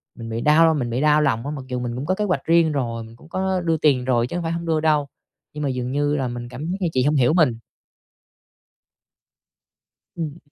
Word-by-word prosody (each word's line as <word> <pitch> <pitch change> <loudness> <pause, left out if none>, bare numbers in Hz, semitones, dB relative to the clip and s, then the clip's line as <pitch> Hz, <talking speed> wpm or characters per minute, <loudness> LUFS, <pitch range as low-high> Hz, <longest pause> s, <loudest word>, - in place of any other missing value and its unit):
mình 115 -1 -8
bị 115 +1 -3
đau 160 +3 +5
mình 130 -6 -2
bị 120 +3 -1
đau 150 0 +4
lòng 120 -5 0
á, 145 - -3
mặc 135 - -7
dù 125 -1 -3
mình 120 -1 -4
cũng 130 +3 -4
có 185 - +1
kế 210 - -1
hoạch 185 - -1
riêng 165 -1 +4
rồi, 120 -5 -2
mình 115 +1 -13
cũng 155 +7 -18
có 190 0 -1
đưa 165 -2 +1
tiền 140 -5 +2
rồi 120 -2 +2
chứ 150 - -6
hông 175 - -2
phải 165 - -2
hổng 170 0 -3
đưa 160 -1 +1
đâu. 155 -2 +2 0.5
Nhưng 150 0 -5
mà 140 - 0
dường 125 -1 -3
như 145 +1 +1
là 135 -3 -1
mình 120 0 -6
cảm 135 +4 -7
giác 190 - -2
như 180 - +1
chị 130 - +2
hông 150 +3 +2
hiểu 130 +1 +3
mình. 150 -10 +3 2.6
Ừm. 160 -2 -4
145 Hz, 245 wpm, -22 LUFS, 125-160 Hz, 2.6 s, đau